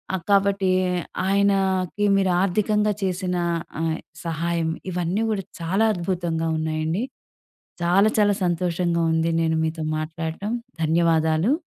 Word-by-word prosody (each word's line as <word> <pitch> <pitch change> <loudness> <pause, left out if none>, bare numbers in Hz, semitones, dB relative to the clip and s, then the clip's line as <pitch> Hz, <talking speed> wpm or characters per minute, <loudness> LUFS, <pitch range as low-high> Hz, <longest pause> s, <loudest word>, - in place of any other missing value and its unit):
ఆ! - - 0
కాబట్టి 200 -1 +3 0.6
ఆయనకి 195 -1 +1
మీరు 190 -2 +2
ఆర్థికంగా 210 +2 +1
చేసిన 185 -1 -1 0.5
ఆహ్, 160 -1 0 0.3
సహాయం 165 0 -1 0.2
ఇవన్నీ 180 +4 -1
గూడా 200 -4 -2 0.2
చాలా 195 +7 +2
అద్భుతంగా 170 -2 -2
ఉన్నాయండి. 160 +5 -1 0.8
చాలా, 195 +5 +4
చాలా 205 -1 +4
సంతోషంగా 175 0 0
ఉంది 160 +1 +1
నేను 160 -1 +1
మీతో 160 0 -3
మాట్లాడటం. 160 +7 -4 0.3
ధన్యవాదాలు. 165 - +2
175 Hz, 105 wpm, -23 LUFS, 165-195 Hz, 0.8 s, చాలా